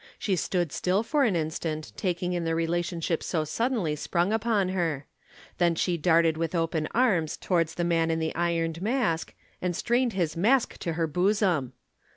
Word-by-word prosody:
She 195 - 0
stood 175 -2 -1
still 185 +8 +1
for 285 +3 +2
an 210 -7 +1
instant, 155 -1 -3
taking 180 -2 -1
in 175 -1 -1
the 165 0 0
relationship 165 0 -1
so 160 -3 -1
suddenly 195 - -1
sprung 175 +6 0
upon 220 -4 +1
her. 165 -7 -1 0.5
Then 170 -1 +3
she 175 +2 0
darted 165 -1 +3
with 165 +1 -2
open 165 -2 0
arms 195 -11 +2
towards 165 -3 0
the 175 - -1
Man 165 -1 +2
in 165 - +1
the 160 0 -2
Ironed 165 -1 -1
Mask 215 -7 0 0.3
and 180 -1 -1
strained 240 +3 +1
his 170 -5 -1
Mask 230 +9 +2
to 170 - -2
her 165 +1 0
bosom. 180 - +1
170 Hz, 175 wpm, -27 LUFS, 165-190 Hz, 0.5 s, Then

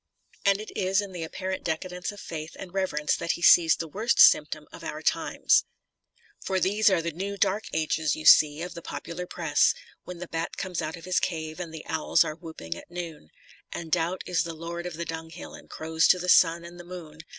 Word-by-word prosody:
And 200 0 +4
it 215 - -8
is 190 +1 +1
in 200 -2 -3
the 180 -2 -6
apparent 185 +3 -4
decadence 180 +3 -3
of 205 - -12
faith 155 -3 -7
and 185 -2 -9
reverence 170 -6 0
that 170 -1 -1
he 170 - -7
sees 165 -2 +7
the 165 - -5
worst 215 +9 0
symptom - - +6
of - - -11
our - - -6
times. - - +2 0.8
For 190 -1 0
these 205 +4 +3
are 180 -4 +1
the 170 - -2
new 195 +5 -5
dark 200 +3 +1
ages, 155 -1 0
you 155 - -8
see, 150 +1 +7
of 180 - -6
the 170 - -8
popular 170 +4 -6
press. 160 -5 +2 0.3
When 180 - -8
the 180 +1 -7
bat 165 0 -4
comes 180 -3 -3
out 160 +1 -4
of 165 - -12
his 185 0 +2
cave, 160 -1 -3
and 170 -2 -5
the 160 -1 -9
owls 160 -1 +2
are - - -4
whooping 160 - -7
at - - -12
noon, 170 - -7 0.4
And 165 -2 -6
Doubt 175 +2 0
is 175 -2 +1
the 165 -1 -6
lord 170 +2 -5
of 175 - -6
the 170 +1 -4
dunghill 160 0 -7
and - - -13
crows 160 +1 +1
to 185 - +5
the 180 0 -4
sun 170 -1 +5
and 175 +1 -11
the - - -9
moon. 170 -4 -10
170 Hz, 220 wpm, -27 LUFS, 160-180 Hz, 0.8 s, sees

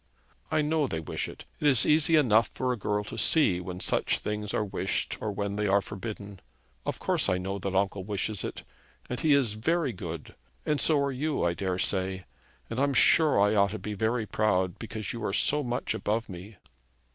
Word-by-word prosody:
'I 155 - +2
know 150 -1 +1
they 80 - -3
wish 80 - -4
it. - - -11
It 150 - +2
is 130 -5 +4
easy 155 +1 +4
enough 115 -7 +5
for 130 -1 -2
a - - -2
girl 105 -1 -1
to 115 +2 -6
see 100 - +3
when 90 0 -6
such - - +1
things 105 0 -3
are 105 - 0
wished 95 -1 -2
or 110 - -1
when 100 0 -3
they 105 0 0
are 100 +1 +4
forbidden. 100 -1 -7 0.5
Of - - -1
course - - 0
I 90 - +2
know 95 +2 -3
that 95 0 -3
uncle 100 0 +1
wishes 100 0 -2
it. - - -5 0.5
And 125 - -2
he 155 -3 +4
is 130 -7 +3
very 145 +5 0
good; 85 -5 -7 0.3
and 150 -1 +1
so 155 -3 +3
are 140 - 0
you, 145 +3 -1
I 85 - +2
daresay. 95 0 -1 0.4
And 115 - -4
I'm 140 0 +2
sure 155 -6 +5
I 105 +1 +4
ought 100 -1 +4
to 110 - -4
be 105 +1 -5
very 110 +2 0
proud, 95 -4 0
because 110 -2 -5
you 115 -2 -6
are 95 - -1
so 140 +8 +2
much 125 -3 -2
above 110 +2 -1
me.' 95 +3 -9
105 Hz, 205 wpm, -28 LUFS, 95-130 Hz, 0.5 s, enough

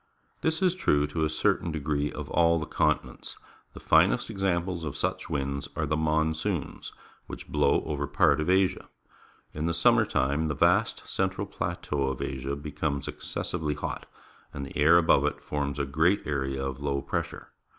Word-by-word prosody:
This 160 +3 0
is 180 -2 +4
true 75 - +2
to 80 +2 -2
a 80 - +1
certain 80 +2 0
degree 75 -1 -1
of - - -6
all 85 0 +4
the 80 - -3
continents. - - -1 0.4
The - - -8
finest - - +3
examples 90 -3 -1
of 75 -3 -4
such - - -2
winds 70 0 -2
are 80 - -1
the 75 +1 0
Monsoons, 80 +2 -1 0.4
which - - -8
blow - - +2
over 75 -2 -2
part 70 +2 +3
of 75 - -2
Asia. 95 0 +2 0.6
In 75 +2 -2
the 85 - 0
summer 85 - +4
time 70 +4 0
the 75 - -2
vast - - +2
central 95 +1 -1
plateau 85 -7 -3
of 65 -2 -3
Asia 65 +1 -3
becomes 70 0 -3
excessively 75 -2 -3
hot, 75 - -5 0.4
and 70 -1 -6
the 70 - -11
air 80 +4 +6
abo\"e 85 - +4
it - - -3
forms 70 -1 -3
a 70 - 0
great 80 +8 +2
area 70 -2 -2
of 65 -1 -4
low 70 -1 -2
pressure. - - -4
75 Hz, 170 wpm, -28 LUFS, 70-85 Hz, 0.6 s, air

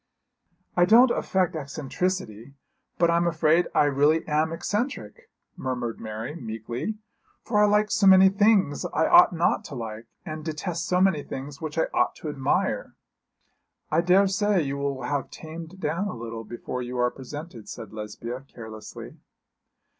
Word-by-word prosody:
'I 175 - +6
don't 235 +6 +6
affect 185 -7 0
eccentricity, 140 - -4 0.4
but 170 0 +3
I'm 170 +1 +2
afraid 165 +1 +3
I - - +5
really 145 +3 +2
am 155 +1 +1
eccentric,' 240 - -4 0.3
murmured 125 -3 -3
Mary, 110 +4 -5
meekly, 120 - -5 0.5
'for 210 -3 +1
I - - +5
like 210 0 +2
so 195 - +3
many 190 0 +8
things 200 -6 +3
I - - +3
ought 345 +3 +7
not 170 -1 +1
to 140 - -8
like, 115 -1 -6 0.2
and 155 -2 -6
detest 165 +2 -3
so 180 0 +2
many 185 -6 +3
things 140 +1 -7
which 155 0 -5
I 160 - +4
ought - - +2
to 155 - -6
admire.' 135 -3 -1 1.0
'I 160 +2 +3
daresay 195 +1 +3
you 140 0 -3
will 140 -2 -2
have 140 +3 -2
tamed 165 +3 -9
down 170 +4 -1
a - - -5
little 115 -1 -6
before 120 +3 -5
you 125 0 -5
are 125 0 +2
presented,' 135 -3 -9
said 110 -3 -8
Lesbia, 110 +4 -6
carelessly. 110 -2 -10
155 Hz, 155 wpm, -26 LUFS, 125-185 Hz, 1.0 s, many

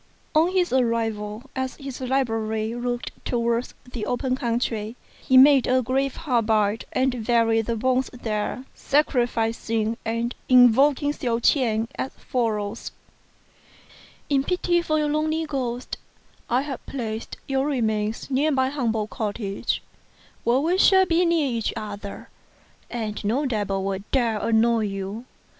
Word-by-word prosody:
On 320 +3 +4
his 360 -6 +1
arrival, 225 -2 -1
as 260 -1 -2
his 275 -2 -8
library 225 -4 -1
looked 245 0 -3
towards 235 0 -1 0.2
the 220 -4 -4
open 255 +1 0
country, 230 -3 -2 0.3
he 260 - +4
made 270 0 +7
a 255 0 +3
grave 265 +2 0
hard 245 -8 0
by 215 -1 +2
and 255 -3 0
buried 225 -1 +2
the 235 - 0
bones 255 +3 +1
there, 230 +1 -3
sacrificing, 230 -5 0
and 230 +2 -2 0.2
invoking 265 +4 +5
Hsiao 240 -5 -1
ch'ien 230 -3 +2
as 265 - -3
follows: 225 -4 -2 0.7
" - - -25
In 275 -1 +3
pity 350 +1 +1
for 310 -2 0
your 300 -1 +1
lonely 310 +2 0
ghost, 255 -4 -3 0.5
I 250 +3 +2
have 280 -3 -6
placed 225 -4 -5
your 270 +1 0
remains 220 -3 -1
near 280 +4 +2
my 260 -3 +2
humble 230 -6 -1
cottage, 205 -2 -3 0.6
where 245 +3 +3
we 350 +5 +1
shall 380 -1 +6
be 345 0 +2
near 335 -3 +2
each 230 -5 -1
other, 205 -2 -7 0.6
and 220 -3 -4
no 240 +8 0
devil 205 -6 -1
will 195 0 -2
dare 235 -5 +1
annoy 230 0 +2
you. 195 +3 -5
240 Hz, 140 wpm, -24 LUFS, 220-270 Hz, 0.7 s, made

